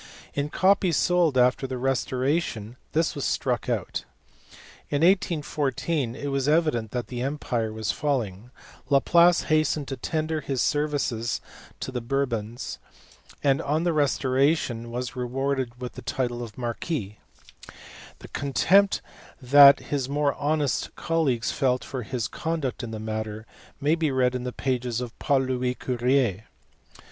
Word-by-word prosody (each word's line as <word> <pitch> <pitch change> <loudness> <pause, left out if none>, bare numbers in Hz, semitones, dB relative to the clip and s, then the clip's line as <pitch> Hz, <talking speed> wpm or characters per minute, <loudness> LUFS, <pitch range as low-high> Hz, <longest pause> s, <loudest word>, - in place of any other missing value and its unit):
In 145 +1 -1
copies 185 -2 +3
sold 175 -6 +3
after 125 +2 +3
the 130 -1 -4
restoration 130 -2 -1 0.2
this 165 +1 +1
was 140 - -4
struck 125 -2 -1
out. 110 -7 -2 0.9
In 145 +2 0
1814 150 -6 +1
it 145 - -4
was 135 0 0
evident 150 -9 +2
that 125 +1 -3
the 125 -1 -5
empire 125 -5 -2
was 110 -4 -2
falling; 115 -2 -2 0.4
Laplace 170 +5 +5
hastened 155 -2 +1
to 135 - -4
tender 155 +3 -2
his 135 -3 -3
services 140 -6 0 0.4
to - - -4
the 125 -1 -3
Bourbons, 120 -2 -3 0.6
and 135 -1 +3
on 155 +3 0
the 175 -1 +1
restoration 135 -4 +1
was 125 +1 -4
rewarded 130 0 -2
with 125 -1 -6
the - - -9
title 120 +2 -2
of 115 -3 -8
marquis: 120 - -4 1.0
the - - -12
contempt 190 +8 +3 0.4
that 140 +2 +8
his 135 -3 -1
more 145 0 +1
honest 145 0 -1
colleagues 145 -9 0
felt 130 -3 +1
for 130 -2 -5
his 120 -1 -3
conduct 160 -6 -3
in 120 - -5
the 110 -1 -5
matter 110 0 -4 0.3
may 145 +3 +2
be 165 -2 +1
read 130 -2 +2
in 125 0 -3
the 125 - -2
pages 125 -3 -2
of 125 -2 -7
Paul 140 -3 +2
Louis 125 -1 -1
Courier. 125 -5 0
130 Hz, 140 wpm, -26 LUFS, 120-150 Hz, 1.0 s, that